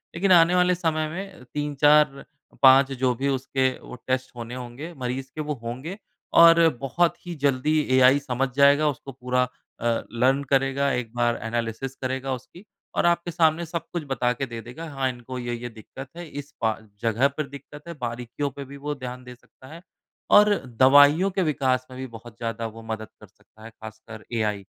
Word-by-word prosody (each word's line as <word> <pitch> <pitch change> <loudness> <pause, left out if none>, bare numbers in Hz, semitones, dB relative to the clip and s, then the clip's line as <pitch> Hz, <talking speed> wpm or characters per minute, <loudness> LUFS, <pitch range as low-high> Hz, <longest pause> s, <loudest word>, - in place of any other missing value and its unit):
लेकिन 190 +3 +1
आने 175 0 +6
वाले 180 0 +3
समय 160 -3 -1
में 190 -2 -8
3-4-5 140 -2 +3
जो 130 -1 +1
भी 135 +4 -2
उसके 135 0 0
वो - - -10
टेस्ट 130 -1 -2
होने 120 +1 -7
होंगे 130 +7 -8
मरीज़ 130 +1 -4
के 155 - -3
वो 150 0 -2
होंगे 130 - -6 0.5
और 165 0 +7
बहुत 170 +7 0
ही 175 -1 -5
जल्दी 140 +3 +2 0.2
एआई 130 +2 +6
समझ 135 -1 -2
जाएगा, 140 +2 +5
उसको 135 -1 -6
पूरा 125 0 0 0.3
अ, 115 -1 0
लर्न 130 +4 +2
करेगा। 135 0 +2
1 120 -2 -3
बार 120 -1 +1
एनालिसिस 115 +3 -3
करेगा 130 +1 -2
उसकी 130 +9 -10 0.3
और - - +1
आपके 170 0 +1
सामने 165 0 +2
सब 170 0 -5
कुछ 170 -2 -2
बता 125 -2 0
के 135 +2 -3
दे 115 -2 -7
देगा, 145 +9 -9
हाँ, 135 -2 -1
इनको 125 +1 -7
ये 120 -1 -4
ये 120 +1 -6
दिक्कत 120 +4 -11
है, 175 -1 -7
इस 145 -1 -8
पा 110 -1 +3
अ, 110 0 -10
जगह 115 +3 +2
पर 140 +1 -5
दिक्कत 145 +2 -12
है, 170 - -5
बारीकियों 120 +4 -3
पे 140 +1 -8
भी 140 +1 -11
वो 145 +1 -4
ध्यान 125 -1 -7
दे 125 0 -11
सकता 130 +1 -19
है 170 - -11 0.5
और 210 0 +7 0.3
दवाइयों 145 +7 +6
के 190 - -1
विकास 130 -5 0
में 130 - -9
भी 130 - -4
बहुत 115 -1 -12
ज़्यादा 115 0 -4
वो 115 - -10
मदद 110 -1 -5
कर 105 - -14
सकता 105 +2 -22
है 115 - -9
ख़ासकर 110 0 -11
एआई। 105 -3 -1
135 Hz, 190 wpm, -24 LUFS, 120-150 Hz, 0.5 s, और